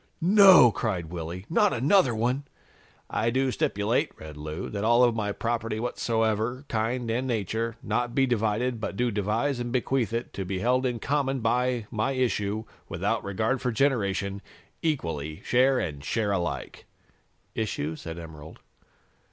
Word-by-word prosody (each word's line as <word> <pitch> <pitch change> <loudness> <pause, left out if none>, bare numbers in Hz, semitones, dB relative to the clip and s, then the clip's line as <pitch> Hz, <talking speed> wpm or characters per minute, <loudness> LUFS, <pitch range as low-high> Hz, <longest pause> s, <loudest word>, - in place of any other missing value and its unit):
'" - - -43
"No!" 185 - +8
cried 90 -8 -3
Willy. 85 +2 -6
"Not 210 +3 +3
another 135 - +3
one!" 125 +5 0 0.7
"'I 115 - +1
do 130 +2 +1
stipulate,'" 105 -1 0
read 80 -1 -9
Lou, 75 +4 -5
"'that 100 -1 -4
all 120 +2 +5
of 120 -1 +4
my 105 -2 -1
property, 115 0 -2
of 110 - -4
whatsoever 115 +1 -1
kind 115 +2 -1
and 125 +3 -1
nature, 115 0 -2
not 120 -1 -1
be 135 - +4
divided, 115 0 0
but 100 - -4
do 120 -1 +1
devise 110 +7 0
and 120 0 -3
bequeath 125 -2 0
it 115 +1 -3
to 95 - -3
be 95 +1 -3
held 125 +5 +2
in 120 -2 -2
common 135 +1 0
by 125 0 0
my 115 +4 0
issue, 110 -5 -1 0.3
without - - -1
regard 110 +6 -1
for 125 - 0
generation, 100 -6 0 0.4
equally, 80 - -2
share 130 +2 +3
and 75 - -3
share 105 +6 0
alike.'" 90 -4 -3 0.7
"Issue?" 80 -8 -2
said 80 +1 -7
Emerald. 80 -2 -10
115 Hz, 160 wpm, -27 LUFS, 100-125 Hz, 0.7 s, No